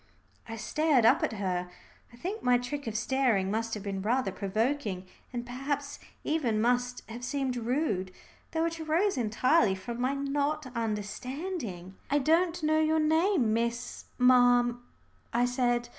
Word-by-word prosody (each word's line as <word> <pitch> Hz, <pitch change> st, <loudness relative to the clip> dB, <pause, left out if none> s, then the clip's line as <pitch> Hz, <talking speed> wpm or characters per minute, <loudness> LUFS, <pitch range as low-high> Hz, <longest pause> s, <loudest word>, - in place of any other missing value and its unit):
I 225 Hz, -, -4 dB
stared 290 Hz, +1 st, +2 dB
up -, -, +5 dB
at -, -, 0 dB
her. 180 Hz, -3 st, -2 dB, 0.4 s
I -, -, -14 dB
think 390 Hz, -, -4 dB
my 250 Hz, 0 st, +4 dB
trick 265 Hz, +2 st, -5 dB
of 220 Hz, -1 st, -2 dB
staring 230 Hz, -5 st, +1 dB
must 225 Hz, +1 st, -1 dB
have 210 Hz, -, -7 dB
been 195 Hz, -2 st, -3 dB
rather 235 Hz, +1 st, +1 dB
provoking, 210 Hz, 0 st, -1 dB, 0.3 s
and 240 Hz, -1 st, -4 dB
perhaps 280 Hz, +3 st, -3 dB, 0.2 s
even 260 Hz, -9 st, 0 dB
must 245 Hz, +2 st, +1 dB
have 235 Hz, +2 st, -8 dB
seemed 265 Hz, 0 st, -1 dB
rude, 235 Hz, -, -1 dB, 0.4 s
though 325 Hz, 0 st, +1 dB
it 330 Hz, 0 st, -3 dB
arose 330 Hz, +6 st, +1 dB
entirely 245 Hz, 0 st, +2 dB
from 235 Hz, +6 st, -6 dB
my 260 Hz, +2 st, +1 dB
not 285 Hz, +2 st, -1 dB
understanding. 225 Hz, -, -4 dB
"I 285 Hz, -, +3 dB
don't 330 Hz, +4 st, +2 dB
know 310 Hz, 0 st, +3 dB
your 315 Hz, 0 st, +3 dB
name, 315 Hz, -, +3 dB
Miss 235 Hz, +1 st, -2 dB
ma'am," 245 Hz, -1 st, +5 dB, 0.5 s
I 240 Hz, +1 st, +3 dB
said. 245 Hz, -1 st, 0 dB
245 Hz, 150 wpm, -29 LUFS, 225-290 Hz, 0.5 s, up